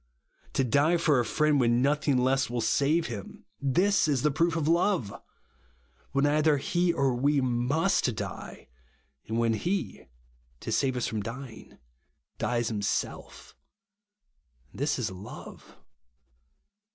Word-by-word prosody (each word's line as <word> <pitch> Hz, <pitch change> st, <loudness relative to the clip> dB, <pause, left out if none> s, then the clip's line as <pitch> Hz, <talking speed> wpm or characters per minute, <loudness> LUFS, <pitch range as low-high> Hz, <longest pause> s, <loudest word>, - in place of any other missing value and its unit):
To 135 Hz, -, +1 dB
die 145 Hz, +8 st, +3 dB
for 155 Hz, -5 st, +3 dB
a -, -, +2 dB
friend 150 Hz, +5 st, +2 dB
when 120 Hz, -1 st, +3 dB
nothing 145 Hz, -1 st, +2 dB
less 130 Hz, +1 st, +1 dB
will 120 Hz, 0 st, -2 dB
save 140 Hz, +8 st, +2 dB
him; 105 Hz, -8 st, -8 dB, 0.2 s
this 180 Hz, +9 st, +2 dB
is 140 Hz, -5 st, 0 dB
the 150 Hz, -, +3 dB
proof 165 Hz, +3 st, +1 dB
of 155 Hz, -2 st, -1 dB
love! 170 Hz, -, +1 dB, 1.0 s
When 140 Hz, +1 st, +2 dB
either 150 Hz, 0 st, +3 dB
he 175 Hz, +5 st, +1 dB
or 140 Hz, -5 st, +1 dB
we 140 Hz, +4 st, +2 dB
must 130 Hz, -, +1 dB
die; -, -, -7 dB, 0.6 s
and 110 Hz, -, -2 dB
when 115 Hz, -1 st, +2 dB
he, 175 Hz, -, -3 dB, 0.5 s
to -, -, -5 dB
save 130 Hz, -2 st, +1 dB
us 125 Hz, -, -1 dB
from 110 Hz, -2 st, -2 dB
dying, 115 Hz, +2 st, -9 dB, 0.6 s
dies 120 Hz, -1 st, 0 dB
himself; 105 Hz, -3 st, -4 dB, 1.2 s
this 145 Hz, +3 st, -1 dB
is 115 Hz, -6 st, -2 dB
love. 95 Hz, +3 st, -11 dB
135 Hz, 130 wpm, -28 LUFS, 120-155 Hz, 1.2 s, die